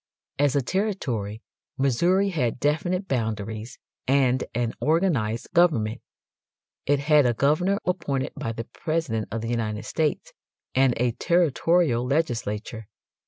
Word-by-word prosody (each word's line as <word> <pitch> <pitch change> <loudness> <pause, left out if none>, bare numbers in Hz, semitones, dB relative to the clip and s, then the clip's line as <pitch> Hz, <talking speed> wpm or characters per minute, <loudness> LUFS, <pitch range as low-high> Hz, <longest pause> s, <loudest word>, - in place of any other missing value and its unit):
As 145 -1 +3
a 140 - +2
territory 125 - -2 0.3
Missouri 175 +10 +2
had 125 -10 -1
definite 175 +7 0
boundaries 110 -2 -3 0.3
and 130 -1 +3
an 120 -1 0
organized 150 - +1
government. 125 -11 +2 0.9
It 145 +1 +4
had 150 -2 +4
a 120 - +1
governor 155 - +2
appointed 155 -7 -1
by 115 - -4
the 115 - -5
President 120 -3 -2
of 115 +1 -3
the 115 - -4
United 110 -3 -2
States, 155 -2 -1 0.4
and 130 -1 +3
a 120 0 +1
territorial 165 -3 +2
legislature. 115 -6 -2
135 Hz, 120 wpm, -25 LUFS, 115-165 Hz, 0.9 s, It